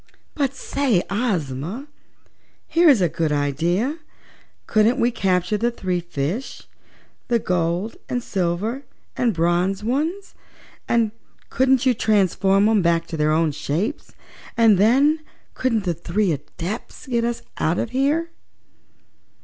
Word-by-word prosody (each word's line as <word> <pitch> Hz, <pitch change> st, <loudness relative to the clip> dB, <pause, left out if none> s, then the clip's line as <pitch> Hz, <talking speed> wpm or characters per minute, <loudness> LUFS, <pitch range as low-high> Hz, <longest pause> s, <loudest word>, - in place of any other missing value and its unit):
"But 275 Hz, -3 st, -1 dB
say, 260 Hz, -10 st, 0 dB
Ozma, 190 Hz, -, -2 dB, 0.8 s
here's 320 Hz, -, +4 dB
a 175 Hz, -, +4 dB
good 160 Hz, -1 st, -1 dB
idea! 170 Hz, -, 0 dB, 0.7 s
Couldn't 225 Hz, +4 st, +3 dB
we 240 Hz, +1 st, +3 dB
capture 185 Hz, -2 st, 0 dB
the 235 Hz, +3 st, +1 dB
three 185 Hz, -6 st, -2 dB
fishes 175 Hz, -, -4 dB, 0.6 s
the 240 Hz, -, +2 dB
gold 180 Hz, +1 st, -1 dB
and 245 Hz, -1 st, -2 dB
silver 195 Hz, +8 st, -2 dB, 0.3 s
and 240 Hz, -2 st, +1 dB
bronze 175 Hz, +3 st, 0 dB
ones, 315 Hz, -, -2 dB, 0.5 s
and 230 Hz, -2 st, +2 dB, 0.4 s
couldn't 260 Hz, 0 st, +3 dB
you 255 Hz, -, +4 dB
transform 195 Hz, -2 st, +2 dB
'em 220 Hz, -2 st, +3 dB
back 170 Hz, -1 st, +2 dB
to 165 Hz, -, -4 dB
their 150 Hz, 0 st, +2 dB
own 160 Hz, 0 st, +2 dB
shapes, 185 Hz, -, -3 dB, 0.4 s
and 225 Hz, -5 st, +5 dB
then 275 Hz, +9 st, +4 dB, 0.3 s
couldn't 230 Hz, -5 st, 0 dB
the 175 Hz, -3 st, 0 dB
three 175 Hz, +4 st, -1 dB
Adepts 165 Hz, -, -6 dB
get 240 Hz, -3 st, 0 dB
us 235 Hz, 0 st, -2 dB, 0.2 s
out 165 Hz, +3 st, +1 dB
of 230 Hz, -, -2 dB
here?" 295 Hz, +6 st, 0 dB
210 Hz, 125 wpm, -22 LUFS, 175-245 Hz, 0.8 s, and